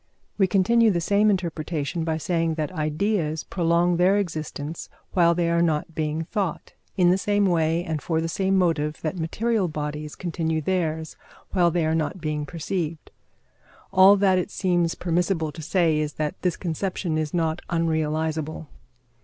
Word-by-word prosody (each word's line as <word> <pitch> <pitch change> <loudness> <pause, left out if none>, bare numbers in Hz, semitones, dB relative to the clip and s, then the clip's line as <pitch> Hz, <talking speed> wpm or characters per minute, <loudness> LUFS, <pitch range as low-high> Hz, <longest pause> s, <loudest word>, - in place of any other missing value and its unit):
We 190 - +5
continue 220 +5 +4
the 180 -4 +1
same 200 +5 +3
interpretation 165 -4 -2
by 160 -1 -1
saying 165 0 0
that 155 0 -2
ideas 160 0 -1
prolong 170 0 +1
their 185 +3 +4
existence 160 -4 -4 0.2
while 170 -2 +4
they 170 -1 +1
are 170 0 +2
not 165 -1 0
being 155 0 -2
thought, 190 -1 -3 0.2
in 180 -2 +5
the 185 - +2
same 205 +1 +2
way 165 -2 +1
and 160 -4 -3
for 160 +1 -1
the 165 - -1
same 190 +3 +1
motive 160 -4 +1
that 160 +3 -2
material 210 +5 0
bodies 150 -1 -5
continue 160 -2 -2
theirs 160 -2 -2 0.3
while 175 -2 +3
they 170 -1 0
are 160 - +1
not 160 +2 -1
being 150 -2 -3
perceived. 165 -1 -4 0.8
All 190 +2 +8
that 190 -2 +3
it 180 - -3
seems 175 -4 0
permissible 170 -2 0
to 160 - -9
say 165 -1 +2
is 150 -1 -2
that 150 -1 -3
this 180 -2 0
conception 175 -1 -2
is 155 -2 -2
not 165 -1 -1
unrealisable. 160 -1 -1
165 Hz, 160 wpm, -24 LUFS, 155-185 Hz, 0.8 s, All